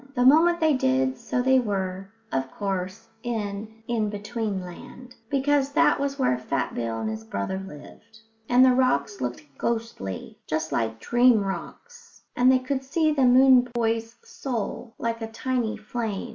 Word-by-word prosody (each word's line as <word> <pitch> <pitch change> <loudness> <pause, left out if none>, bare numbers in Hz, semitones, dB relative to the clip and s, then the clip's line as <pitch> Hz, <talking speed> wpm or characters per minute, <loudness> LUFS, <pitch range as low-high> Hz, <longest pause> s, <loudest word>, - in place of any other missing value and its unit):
The 245 0 +2
moment 335 +5 +6
they 315 -2 +3
did 130 - +1
so 250 - -1
they 265 0 +5
were, 195 -4 -3 0.2
of 135 0 -1
course, 190 +1 -4
in 220 -1 -5
In 220 -3 0
between 205 0 -3
Land, 185 +8 -11 0.2
because 280 0 +1
that 325 -1 +4
was 280 0 -2
where 190 - +1
Fat 130 +1 -2
Bill 115 -1 -3
and 110 - -2
his 110 0 -4
brother 105 - -3
lived; 195 +5 -12 0.3
and 250 +1 +6
the 260 - +6
rocks 250 -5 +1
looked 125 +3 -3 0.2
ghostly, 225 - -4
just 155 0 -2
like 115 0 -1
dream 240 - +4
rocks, 470 - -8
and 250 +1 +5
they 260 - +5
could 260 +1 -3
see 310 +4 +1
the 275 -3 +2
moon 255 0 +6
boy's 225 0 -1
soul, 235 -2 -5
like 230 0 -3
a 225 - -3
tiny 240 -1 -2
flame. 220 0 -4
225 Hz, 160 wpm, -25 LUFS, 190-255 Hz, 0.3 s, moment